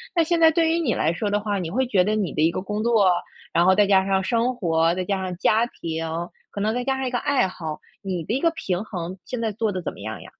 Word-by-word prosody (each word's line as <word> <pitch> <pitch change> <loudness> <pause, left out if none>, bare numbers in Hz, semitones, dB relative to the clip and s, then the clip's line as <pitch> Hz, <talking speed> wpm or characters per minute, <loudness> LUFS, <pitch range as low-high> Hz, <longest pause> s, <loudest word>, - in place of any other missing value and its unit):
那 335 - +4
现 335 +1 +1
在 325 -1 +7
对 325 0 +2
于 335 +1 +2
你 265 -9 +1
来 160 - +1
说 205 +3 -2
的 205 - +2
话， 205 -1 -2
你 165 -3 -3
会 260 +4 +1
觉 190 -6 +3
得 215 +2 0
你 200 -5 -1
的 155 - -1
一 165 - +4
个 185 - -3
工 210 +2 -3
作， 220 -6 +4 0.4
然 170 - +4
后 190 - +6
再 205 +1 +5
加 190 -1 +4
上 190 -1 +1
生 240 +3 +1
活、 165 -5 +2
再 185 - -2
加 195 -1 -1
上 180 -1 -4
家 220 +4 +3
庭， 165 -6 -5 0.4
可 200 - -6
能 215 +2 +1
再 245 - -1
加 265 0 0
上 265 - -2
一 - - 0
个 245 - 0
爱 275 -9 +2
好， 160 -4 -6 0.2
你 180 -4 -3
的 215 - -3
一 - - 0
个 335 +2 +2
平 195 - -3
衡， 185 -3 -6
现 250 +6 -4
在 220 -2 0
做 215 0 -1
得 185 -1 -3
怎 - - -3
么 - - -14
样 110 +1 -5
呀？ - - -11
205 Hz, 315 characters per minute, -23 LUFS, 180-240 Hz, 0.4 s, 在